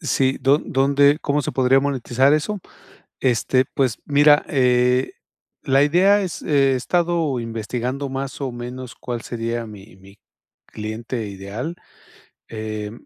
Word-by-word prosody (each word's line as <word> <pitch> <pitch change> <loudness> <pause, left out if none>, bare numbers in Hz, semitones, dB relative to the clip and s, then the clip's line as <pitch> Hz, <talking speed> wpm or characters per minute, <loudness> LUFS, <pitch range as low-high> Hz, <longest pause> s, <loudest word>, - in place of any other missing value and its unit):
Sí, 135 -4 0
¿do 140 +2 +4
dónde 140 +1 +3
cómo 145 0 0
se - - -3
podría 130 +1 +3
monetizar 135 0 +1
eso? 185 +7 0 0.6
Este, 130 +1 +2
pues 130 -5 0
mira, 145 +1 +5
eh, 125 -1 +2 0.5
la 135 +1 +3
idea 190 +7 +4
es, 185 -3 -5
he 135 -3 +2
estado 165 -2 0
investigando 120 +4 -4
más 135 +1 -5
o 135 -2 -3
menos, 125 +1 -7
cuál 120 -2 -6
sería 115 0 -4
mi 100 -3 -13
mi 100 +2 -18 0.5
cliente 110 +1 -5
ideal. 100 - -6 0.7
Em, 110 0 -6
130 Hz, 130 wpm, -21 LUFS, 115-140 Hz, 0.7 s, mira